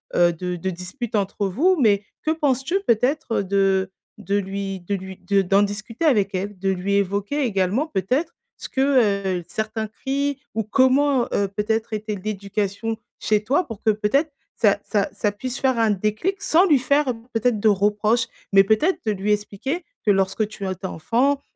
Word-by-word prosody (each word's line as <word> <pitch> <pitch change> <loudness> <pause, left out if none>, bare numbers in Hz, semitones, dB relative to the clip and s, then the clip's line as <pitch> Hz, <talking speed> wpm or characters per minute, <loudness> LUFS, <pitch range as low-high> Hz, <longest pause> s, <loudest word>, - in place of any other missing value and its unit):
heu, 175 0 +4
de 180 +2 -4
de 175 +2 -3
dispute 185 +7 -6
entre 200 0 -1
vous. 325 - +2
Mais 205 -5 +3 0.2
que 310 - +2
penses-tu 295 +3 0
peut-être, 250 +2 +1
heu, - - -4
de 195 -1 +1 0.3
de 205 -1 -1
lui 195 0 -3
de 185 +3 -3
lui 190 0 -7
de 200 -1 +1
d'en 195 +2 +3
discuter 215 +7 -3
avec 205 -10 +3
elle? 195 +2 -3
De 195 +1 -1
lui 190 +2 -1
évoquer 200 +8 0
également 205 +3 +1
peut-être 260 - -1 0.2
ce - - -9
que, 215 -9 +2
heu, - - -9
certains 220 +2 -3
cris 280 +5 -2
ou 220 - -1
comment, 260 +4 +3
heu, 200 - +1
peut-être 220 +3 -1
était 215 0 -3
l'éducation 205 +2 -3 0.2
chez 210 -1 +1
toi, 285 +11 +1
pour 225 -4 -8
que - - +3
peut-être 215 +9 +1 0.2
ça 205 -3 +3
ça 205 -2 0
ça 210 - -1
puisse 250 +5 -5
faire 260 -3 +1
un 225 -1 +3
déclic? 215 - -1
Sans 350 -1 +4
lui 300 -5 +5
faire, 280 +2 +2
heu, - - +1 0.2
peut-être 225 0 +1
de 220 - +2
reproche, 210 +3 +2 0.3
mais 195 0 +8
peut-être 220 - +2
de 215 - +2
lui 205 +1 0
expliquer 210 - -3 0.2
que 210 - +5
lorsque 195 +2 +1
tu 205 -1 -7
as - - -1
été 185 +1 -6
enfant, 255 - 0
210 Hz, 185 wpm, -22 LUFS, 195-255 Hz, 0.3 s, mais